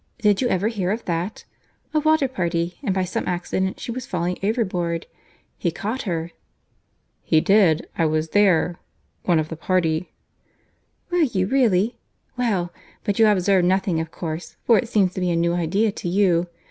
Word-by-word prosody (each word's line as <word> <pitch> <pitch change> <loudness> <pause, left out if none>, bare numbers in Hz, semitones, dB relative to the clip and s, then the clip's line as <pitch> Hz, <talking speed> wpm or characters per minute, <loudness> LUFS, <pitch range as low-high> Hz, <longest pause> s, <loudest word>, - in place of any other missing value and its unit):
Did 210 -3 +2
you 250 - +2
ever 200 -2 +1
hear 200 -5 -1
of 220 +4 -2
that?—A 180 - -5
water 310 -2 +3
party; 170 -6 -2
and 235 -9 -1
by 190 0 +1
some 185 - -3
accident 185 +1 -2
she - - -5
was 255 +2 -5
falling 180 -4 -1
overboard. 185 -6 -1 0.5
He 175 - +1
caught 215 +9 -3
her." 165 -1 -2 0.9
"He 160 - +3
did. 185 -3 +3
I 165 - +2
was 155 +1 0
there—one 175 -2 0
of 155 0 -1
the 165 - -5
party." 165 -1 0 1.0
"Were 355 - +2
you 235 - +2
really?—Well!—But 220 -3 -1
you 220 - +7
observed 190 -2 +3
nothing 185 -2 +1
of 160 0 -3
course, 160 0 -6
for 230 -3 +5
it 240 - -4
seems 195 -6 +2
to 185 - -4
be 180 - +1
a 170 - +1
new 170 +1 +1
idea 185 +6 +1
to 180 - -5
you. 180 -2 +2
185 Hz, 160 wpm, -23 LUFS, 170-215 Hz, 1.0 s, you